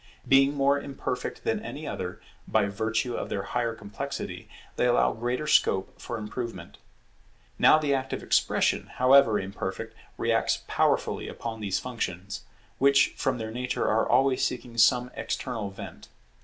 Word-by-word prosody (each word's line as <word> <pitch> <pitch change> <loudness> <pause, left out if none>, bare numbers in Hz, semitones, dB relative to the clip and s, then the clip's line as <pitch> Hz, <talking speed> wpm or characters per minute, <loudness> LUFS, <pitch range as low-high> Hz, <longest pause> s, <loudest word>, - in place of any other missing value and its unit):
Being 135 +1 +5
more 140 0 +2
imperfect 140 -1 -4
than - - -1
any - - -6
other, - - -5 0.3
by 110 -2 +2
virtue 110 +4 -1
of - - -4
their 100 - -2
higher 115 +1 -2
complexity, 100 -2 -6 0.3
they 125 - +2
allow 120 - +3
greater 120 +5 -2
scope 95 -9 +2
for 120 - -4
improvement. 110 +2 -6 0.8
Now - - +7
the 150 -2 +1
act 130 -1 -2
of - - -4
expression, - - +2
however 130 -4 +5
imperfect, 95 +3 -5 0.2
reacts - - +1
powerfully - - +1
upon 115 -1 -6
these 100 -3 -1
functions, 100 -5 -4 0.4
which 140 0 +5
from 130 -1 0
their 110 -1 -5
nature 125 +2 -2
are 110 +1 +2
always 135 -1 +3
seeking 125 -1 -3
some 125 +2 +4
external 115 -6 -3
vent. 100 - -10
120 Hz, 145 wpm, -27 LUFS, 110-130 Hz, 0.8 s, Now